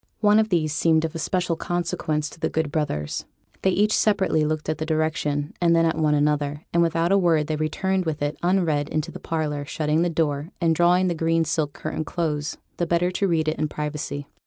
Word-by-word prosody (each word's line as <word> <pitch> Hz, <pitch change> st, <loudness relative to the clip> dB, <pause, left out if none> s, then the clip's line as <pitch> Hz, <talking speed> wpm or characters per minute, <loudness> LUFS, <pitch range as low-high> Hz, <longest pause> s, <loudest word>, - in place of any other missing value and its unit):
One 210 Hz, 0 st, +5 dB
of 220 Hz, 0 st, +1 dB
these 155 Hz, -5 st, +1 dB
seemed 160 Hz, 0 st, +3 dB
of 160 Hz, -, -4 dB
especial 175 Hz, +2 st, -1 dB
consequence 160 Hz, -3 st, -2 dB
to -, -, -14 dB
the -, -, 0 dB
good 160 Hz, -2 st, -1 dB
brothers. 75 Hz, -, -2 dB, 0.4 s
They 190 Hz, -, +3 dB
each 210 Hz, +3 st, +2 dB
separately 195 Hz, -7 st, +2 dB
looked 155 Hz, 0 st, -2 dB
at 155 Hz, -, -2 dB
the -, -, -1 dB
direction, 155 Hz, -2 st, -1 dB
and 170 Hz, -1 st, +4 dB
then 165 Hz, 0 st, +4 dB
at 165 Hz, -, +1 dB
one 150 Hz, -1 st, +2 dB
another; 145 Hz, 0 st, 0 dB
and 170 Hz, -, +4 dB
without 165 Hz, +1 st, +1 dB
a 200 Hz, -, +5 dB
word 165 Hz, -4 st, +3 dB
they 155 Hz, -, -2 dB
returned 185 Hz, +5 st, -1 dB
with 155 Hz, -2 st, -2 dB
it 145 Hz, +1 st, -1 dB
unread 170 Hz, -5 st, +1 dB
into 155 Hz, +2 st, -2 dB
the -, -, -9 dB
parlour, 150 Hz, -3 st, -2 dB
shutting 150 Hz, +2 st, 0 dB
the 175 Hz, -, +2 dB
door, 155 Hz, -2 st, -1 dB
and 165 Hz, -2 st, +3 dB
drawing 175 Hz, +3 st, +3 dB
the 175 Hz, -, +1 dB
green 165 Hz, 0 st, +1 dB
silk 150 Hz, -2 st, -1 dB
curtain 155 Hz, 0 st, -4 dB
close, 150 Hz, -2 st, -2 dB, 0.2 s
the 175 Hz, -, -1 dB
better 175 Hz, +2 st, +1 dB
to 195 Hz, +2 st, 0 dB
read 160 Hz, -3 st, +1 dB
it 155 Hz, -, -1 dB
in 155 Hz, -, +1 dB
privacy. 150 Hz, -1 st, -4 dB
160 Hz, 215 wpm, -24 LUFS, 150-175 Hz, 0.4 s, One